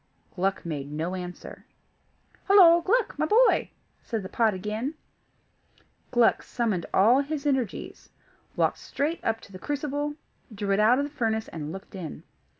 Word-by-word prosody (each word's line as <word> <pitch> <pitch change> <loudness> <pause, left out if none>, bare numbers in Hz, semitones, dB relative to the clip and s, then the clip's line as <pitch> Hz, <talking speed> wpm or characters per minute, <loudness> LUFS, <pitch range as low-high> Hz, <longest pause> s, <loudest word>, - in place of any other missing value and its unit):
Gluck 195 +1 -1
made 145 -4 -4
no 160 +4 -3
answer. 180 -1 -8 0.8
"Hollo! 350 -4 +7
Gluck, 420 -2 0
my 310 - +1
boy," 470 +8 +4 0.3
said 225 -4 -4
the 185 - -7
pot 220 -3 +2
again. 215 - -3 1.1
Gluck 240 -2 +3
summoned 215 -8 -2
all 230 +7 +5
his 290 0 -4
energies, 265 -8 -2 0.5
walked - - +1
straight 310 +4 -3
up 225 0 0
to - - -15
the 185 - -10
crucible, 290 +1 -3 0.4
drew 205 -1 -3
it 195 - +1
out 225 +4 +5
of 280 - +1
the 290 - -8
furnace, 220 -5 -1
and 155 -2 -6
looked 195 +3 -10
in. 180 -6 -7
225 Hz, 150 wpm, -26 LUFS, 190-290 Hz, 1.1 s, Hollo